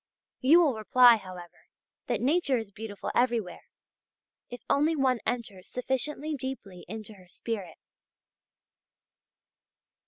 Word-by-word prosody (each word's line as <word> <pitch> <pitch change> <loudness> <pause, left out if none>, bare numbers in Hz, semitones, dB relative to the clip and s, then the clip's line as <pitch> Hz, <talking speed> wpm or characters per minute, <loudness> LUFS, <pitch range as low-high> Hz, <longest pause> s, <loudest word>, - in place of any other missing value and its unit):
You 310 +7 +6
will 290 -5 +2
reply, 235 +2 +6
however, 185 -3 -12 0.4
that 235 -3 -1
nature 280 0 +2
is 220 -3 -6
beautiful 205 0 -6
everywhere, 230 -8 0 0.8
if 245 -2 -9
only 300 +3 +2
one 260 -4 +2
enters 220 -7 -4
sufficiently 270 +4 -2
deeply 260 -10 -6
into 215 +1 -8
her 185 -3 -18
spirit. 190 -2 -6
235 Hz, 105 wpm, -28 LUFS, 205-265 Hz, 0.8 s, You